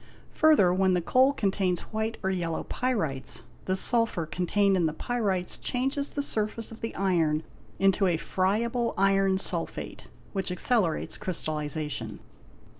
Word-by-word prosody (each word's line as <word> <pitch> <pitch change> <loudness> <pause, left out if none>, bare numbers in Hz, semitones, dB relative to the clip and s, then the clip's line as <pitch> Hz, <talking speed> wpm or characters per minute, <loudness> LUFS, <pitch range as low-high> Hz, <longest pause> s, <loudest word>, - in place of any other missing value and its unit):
Further, 295 - +5
when 190 0 +3
the - - +2
coal 255 +10 +4
contains 195 -7 0
white 220 +1 -2
or 190 - +1
yellow 170 -3 -2
_ - - -22
pyrites, 180 - -1 0.2
the 185 - 0
sulphur 230 -5 +2
contained 195 +4 +1
in 175 -3 +2
the 155 - -4
pyrites 200 -7 -2
changes 270 +3 -1
the 285 - -3
surface 220 -2 -2
of 225 - -11
the 225 - -4
iron 165 -5 +1 0.3
into 195 0 +3
a 170 -2 +2
friable 230 +8 0
iron 195 0 +3
sulphate, 175 -3 -2 0.3
which 195 -2 -2
accelerates 180 -3 0
crystallization. 150 - -2
190 Hz, 140 wpm, -27 LUFS, 175-225 Hz, 0.3 s, Further